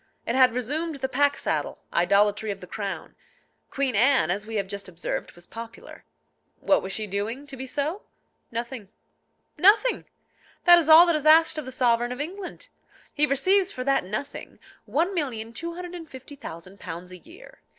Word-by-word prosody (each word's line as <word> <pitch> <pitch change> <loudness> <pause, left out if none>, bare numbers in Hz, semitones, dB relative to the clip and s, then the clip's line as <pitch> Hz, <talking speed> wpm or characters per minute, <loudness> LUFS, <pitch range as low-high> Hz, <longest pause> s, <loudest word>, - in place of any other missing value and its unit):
It 230 - -1
had 255 -2 +4
resumed 300 +6 -2
the 265 -1 -3
pack 285 +2 +2
saddle, - - -3
idolatry 205 +4 +2
of 200 -1 -4
the 180 - -10
crown. 195 -3 -6 0.5
Queen 270 -4 -1
Anne, 240 - +4
as 205 +3 -3
we 225 - -6
have 200 -2 0
just 200 0 -6
observed, 175 -1 -5
was 175 0 -13
popular. 230 +4 -11 0.5
What 290 - +3
was 190 - -6
she 215 +2 -1
doing 210 +7 -3
to 280 -1 -9
be 265 0 -7
so? 300 +9 -2 0.5
Nothing. 235 -3 -5 0.7
Nothing! 435 +6 +4 0.6
that 350 -1 +9
is 320 -2 -2
all 320 +2 +10
that 340 -2 +2
is 305 0 -1
asked 320 0 +5
of 300 - -6
the 260 - -7
sovereign 240 -1 +1
of 250 - -6
England. 365 +6 -6 0.4
He 300 0 +3
receives 375 +8 +2
for 255 - -5
that 275 +1 +2
nothing 215 +9 -6 0.3
£1,250,000 265 - -5
a 180 - -9
year. 335 - -16
260 Hz, 160 wpm, -25 LUFS, 210-310 Hz, 0.7 s, all